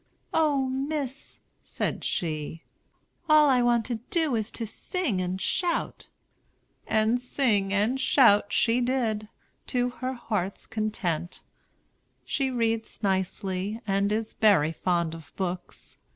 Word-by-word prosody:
"O 290 -4 +2
Miss," 270 0 -4 0.2
said - - -3
she, 155 -1 -3 0.7
"all 305 -1 +7
I 250 -1 +4
want 240 -2 +2
to 240 -3 -2
do 320 -7 +1
is 220 0 0
to 230 - -3
sing 240 - -2
and 185 +1 -2
shout!" 345 - -1 0.8
And 220 +2 +2
sing 220 -7 +1
and 215 +6 +1
shout 230 -6 +5
she 235 +2 +2
did, 230 -4 -1 0.4
to 245 -1 +1
her 255 +2 -4
heart's 210 -6 -3
content. 185 -6 -3 0.8
She 270 -2 0
reads 230 -3 -1
nicely, 190 +1 -1
and 200 0 +1
is 220 +1 -1
very 190 -8 +4
fond 170 -1 0
of 160 -2 -11
books. 180 -1 -5
220 Hz, 125 wpm, -27 LUFS, 195-255 Hz, 0.8 s, all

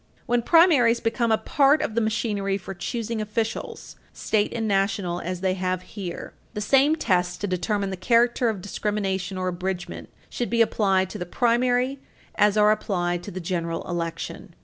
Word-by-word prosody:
When 240 0 +1
primaries 285 -7 +5
become 230 0 0
a 220 - +4
part 280 +6 +3
of - - -3
the 230 - +1
machinery 205 -3 -1
for 195 0 -8
choosing 225 +4 -3
officials, 215 +1 -4 0.2
state 210 -1 0
and 225 -1 -2
national, 195 -3 0
as 180 0 -4
they 190 -1 +1
have 185 -1 -2
here, 185 -2 -7 0.2
the - - -2
same 270 +8 +4
tests 180 - 0
to 200 - -3
determine 195 +2 -1
the - - -3
character 235 +4 +3
of 210 -4 -3
discrimination 195 -2 -2
or 185 0 -1
abridgement 180 0 -5 0.2
should 240 - -3
be 230 0 +4
applied 190 -4 +1
to - - -7
the 175 - -5
primary 245 +5 +1 0.3
as 210 0 +3
are 210 0 +5
applied 175 -5 -1
to - - -8
the 185 - -6
general 170 -1 -3
election. 165 -1 -5
205 Hz, 170 wpm, -24 LUFS, 185-230 Hz, 0.3 s, primaries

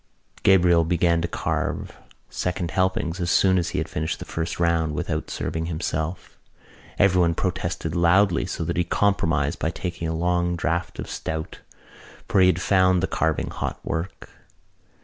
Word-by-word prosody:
Gabriel 90 -3 +5
began 85 0 +2
to 85 - -1
carve - - -3 0.3
second 90 -2 -3
helpings 95 -1 0
as 85 -1 -1
soon 95 +1 +4
as 85 - -1
he - - -4
had - - -1
finished 80 +1 -3
the - - -8
first 80 +1 -4
round 85 -3 +1
without - - -3
serving 80 0 -3
himself. 80 0 -4 0.6
Everyone 90 -4 +3
protested 90 -3 -2
loudly 90 +1 +3
so - - -3
that - - -2
he 90 - +3
compromised 80 -6 +1
by 80 - 0
taking 85 0 -4
a 80 - -2
long 85 +1 +1
draught 85 +1 -2
of - - -5
stout 80 0 -5 0.7
for 95 - +3
he 90 - +6
had 90 -2 +2
found 95 -2 +3
the - - +2
carving 80 -1 -1
hot - - -4
work. 80 0 -4
85 Hz, 160 wpm, -24 LUFS, 80-90 Hz, 0.7 s, he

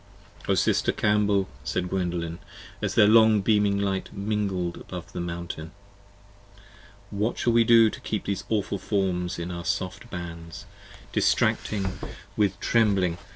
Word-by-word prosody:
O 100 - +3
sister - - +2
Cambel, 105 -2 +2 0.2
said 90 0 -2
Gwendolen, 85 -3 -2 0.4
as - - -2
their - - +7
long 110 -1 +6
beaming 105 -1 +2
light 100 -1 -2
Mingled 100 -4 -2
above 90 -2 -8
the - - -4
Mountain, 85 -1 -6 1.4
what 105 +3 -1
shall 120 - +1
we 115 0 +5
do 115 0 +6
to - - -8
keep 105 - -3
85 - - -27
These 100 -1 -2
awful 100 -2 -1
forms 90 -3 -1
in 85 +1 -4
our 85 -1 -5
soft 100 +4 -3
bands: 85 -3 -7 0.5
distracted 100 -3 +1 0.5
with 100 -2 +1
trembling 100 -6 +2
99 85 - -7
p. - - -19
95 Hz, 150 wpm, -26 LUFS, 90-105 Hz, 1.4 s, their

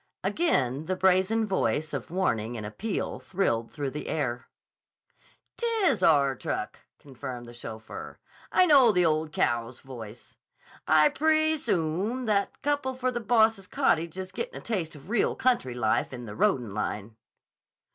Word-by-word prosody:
Again 150 - 0
the 185 - 0
brazen 190 +4 +3
voice 155 - -1
of - - -4
warning 120 - -1
and 105 - -5
appeal 195 - -3
thrilled 115 -12 -1
through 140 -3 -3
the 150 - -6
air. 120 -6 -2 1.1
"'T 475 - -1 0.2
is - - +3
our 140 -3 +4
truck," - - -4 0.2
confirmed 130 -3 -8
the 120 - -11
chauffeur. 110 -2 -8 0.3
"I 370 - +5
know 275 -8 +7
the 180 -3 +3
old 155 -1 +1
caow's 120 -3 -1
voice. 120 -4 -11 0.5
I 155 -1 +6
pree 315 +1 +2
soom 195 - -1
that 205 -2 0
couple 285 -2 0
for 255 0 -1
the 240 - -2
boss's 220 -3 +3
cottage 165 0 +1
is 185 0 -5
gettin' 475 - -5
a - - -15
taste 180 -9 -2
of 145 +1 -13
real 225 0 +1
country 235 - +1
life 110 -3 +1
in 125 -2 -7
the 105 - -7
roadin' 115 -1 +1
line." 105 +1 -4
160 Hz, 155 wpm, -27 LUFS, -, 1.1 s, know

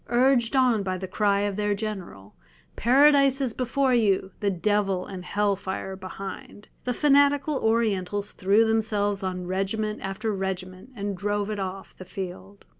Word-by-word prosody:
Urged 245 0 +3
on 250 -5 +3
by 185 -1 -2
the 190 +1 -5
cry 200 +1 +1
of 205 -1 -2
their 205 -1 0
general, 190 - -6 0.4
"Paradise 275 +2 +5
is 260 -5 -1
before 255 +2 0
you, 200 -5 +2
the 205 - +1
devil 195 0 0
and 185 -2 -8
hell 205 +2 0
fire 190 0 -5
behind," 195 +2 -9 0.2
the 250 - 0
fanatical 285 0 +3
Orientals 205 -3 0
threw 200 +4 +3
themselves 210 -2 0
on 185 -1 -3
regiment 195 +4 -2
after 195 +3 -3
regiment 190 +1 -5
and 200 -2 -3
drove 205 +2 -2
it 210 - -3
off 190 0 -6
the 185 - -10
field. 190 +1 -8
205 Hz, 155 wpm, -25 LUFS, 190-225 Hz, 0.4 s, Paradise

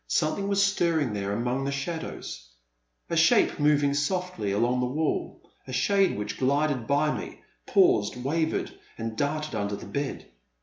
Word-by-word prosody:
Something 165 +5 0
was 200 0 +3
stir 175 -4 +2
ring 140 -8 0
there 100 -1 -2
among 120 +5 -1
the 140 - -1
shadows, 140 - -5 0.3
— - - -48
a - - +1
shape - - +4
moving 145 -1 +3
softly 145 - -1
along 120 +5 +1
the 125 - +1
wall, 150 +4 -2 0.3
a - - -7
shade 195 - +2
which 105 - -4
glided 140 -2 +1
by 150 +2 +2
me, - - -8 0.2
paused, 375 - +4
wavered, 160 +4 0 0.3
and 115 -1 -4
darted 150 +3 -2
under 100 -2 -2
the - - -9
bed. 140 -1 -4
140 Hz, 165 wpm, -27 LUFS, 115-160 Hz, 0.3 s, shape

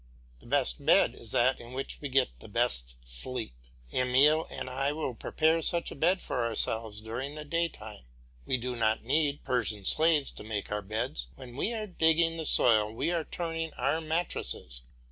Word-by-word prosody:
The - - -17
best - - 0
bed - - +5
is - - -10
that 125 +2 +3
in 120 +1 -10
which 135 +1 -4
we 145 - -4
get 130 - +1
the - - -11
best - - 0
sleep. 65 - -2 0.4
Emile 135 +5 +4
and - - -6
I 135 +2 -1
will 150 -4 -3
prepare 160 +7 +1
such 170 +2 +2
a - - -7
bed 180 +6 +2
for 125 - -2
ourselves 110 -2 +1
during 125 +6 -5
the 150 0 -7
daytime. 145 - -3 0.4
We 130 - +2
do 125 +1 -4
not 110 -1 +1
need 145 +3 +1
Persian 110 -5 -1
slaves 155 - +4
to - - -10
make 105 -2 -4
our 105 0 -1
beds; 110 - -3
when 120 -2 -11
we 205 - -1
are 220 -2 -3
digging 165 -3 +2
the 160 - -2
soil 110 -3 +4
we 140 +9 -1
are 165 -3 -1
turning 165 -2 -4
our 150 +4 0
mattresses. 155 - -2
130 Hz, 185 wpm, -29 LUFS, 110-160 Hz, 0.4 s, bed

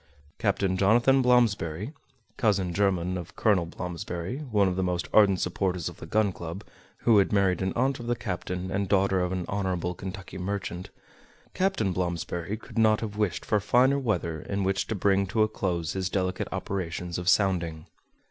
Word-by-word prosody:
Captain 95 -2 +1
Jonathan 120 +7 +4
Blomsberry 115 - +2 0.4
(cousin 100 -6 +1
german 90 -2 +1
of 90 +4 -10
Colonel 100 -7 +2
Blomsberry, 90 +4 -5
one 105 -3 +3
of 90 - -1
the 95 - 0
most 90 -1 -1
ardent 100 -4 +5
supporters 90 -1 -1
of - - -12
the - - -9
Gun 105 -2 +2
Club, 85 +3 -7 0.4
who 115 -3 +6
had 100 - +2
married 100 -3 +2
an 95 0 0
aunt 130 +2 +1
of 120 - -7
the 120 - +1
captain 90 -4 -4
and 100 -1 -1
daughter 95 -1 +3
of 90 0 0
an 90 -2 -2
honorable 95 -3 -1
Kentucky 95 0 -7
merchant)—Captain 100 - -4
Blomsberry 85 +2 -2
could 115 - -6
not 110 -1 +4
have 105 -2 -4
wished 105 -4 -1
for 105 - +2
finer 125 +7 +3
weather 85 - -1
in 100 0 -2
which 95 +1 0
to 110 - -2
bring 100 0 +2
to 110 +3 +2
a - - +3
close 85 -6 -2
his 95 -1 -2
delicate 95 -1 -1
operations 90 -2 -3
of 90 0 0
sounding. 85 -5 +1
95 Hz, 175 wpm, -27 LUFS, 90-105 Hz, 0.4 s, who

